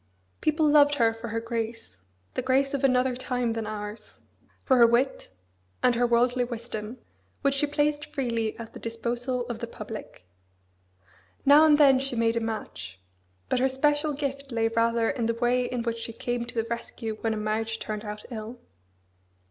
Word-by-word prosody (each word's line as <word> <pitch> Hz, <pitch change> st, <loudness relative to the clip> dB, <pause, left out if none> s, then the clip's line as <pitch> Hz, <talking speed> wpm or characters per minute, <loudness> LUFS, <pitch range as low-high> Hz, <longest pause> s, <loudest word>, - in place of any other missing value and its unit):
People 310 Hz, 0 st, +2 dB
loved 290 Hz, -1 st, +6 dB
her 230 Hz, -4 st, +3 dB
for 225 Hz, +1 st, -7 dB
her 225 Hz, +1 st, -2 dB
grace 230 Hz, -, -5 dB, 0.3 s
the -, -, -1 dB
grace 265 Hz, +2 st, +2 dB
of 280 Hz, -1 st, -2 dB
another 255 Hz, -1 st, +3 dB
time 250 Hz, -2 st, -1 dB
than 225 Hz, -1 st, -3 dB
ours 210 Hz, 0 st, -7 dB, 0.4 s
for 260 Hz, -, +3 dB
her 235 Hz, -1 st, +8 dB
wit, 245 Hz, +3 st, +1 dB, 0.5 s
and 250 Hz, -, +5 dB
her 240 Hz, +1 st, +2 dB
worldly 245 Hz, +1 st, +3 dB
wisdom, 235 Hz, -1 st, -6 dB, 0.5 s
which 275 Hz, 0 st, +3 dB
she 275 Hz, +2 st, +1 dB
placed 290 Hz, 0 st, 0 dB
freely 230 Hz, -5 st, -2 dB
at 230 Hz, -1 st, -9 dB
the -, -, -9 dB
disposal 240 Hz, +2 st, -2 dB
of 235 Hz, -2 st, -5 dB
the 235 Hz, -, -4 dB
public. 210 Hz, -, -9 dB, 1.2 s
Now 290 Hz, +3 st, +8 dB
and 300 Hz, -1 st, +6 dB
then 275 Hz, -3 st, +6 dB
she 270 Hz, -1 st, -3 dB
made 230 Hz, 0 st, +2 dB
a -, -, +2 dB
match: 220 Hz, -, -5 dB, 0.5 s
but -, -, +1 dB
her 265 Hz, +1 st, +3 dB
special 295 Hz, +3 st, +1 dB
gift 275 Hz, -1 st, -4 dB
lay 225 Hz, -1 st, +1 dB
rather 230 Hz, 0 st, +2 dB
in 230 Hz, -1 st, -1 dB
the 230 Hz, -, 0 dB
way 245 Hz, +1 st, +1 dB
in 245 Hz, -1 st, -3 dB
which 230 Hz, 0 st, -2 dB
she 230 Hz, 0 st, -6 dB
came 240 Hz, +1 st, -3 dB
to 235 Hz, -, -9 dB
the -, -, -10 dB
rescue 230 Hz, -1 st, -5 dB
when 225 Hz, -1 st, 0 dB
a -, -, -4 dB
marriage 220 Hz, +1 st, -1 dB
turned 215 Hz, -1 st, -5 dB
out 210 Hz, 0 st, -7 dB
ill. 225 Hz, +1 st, -6 dB
235 Hz, 180 wpm, -27 LUFS, 225-265 Hz, 1.2 s, her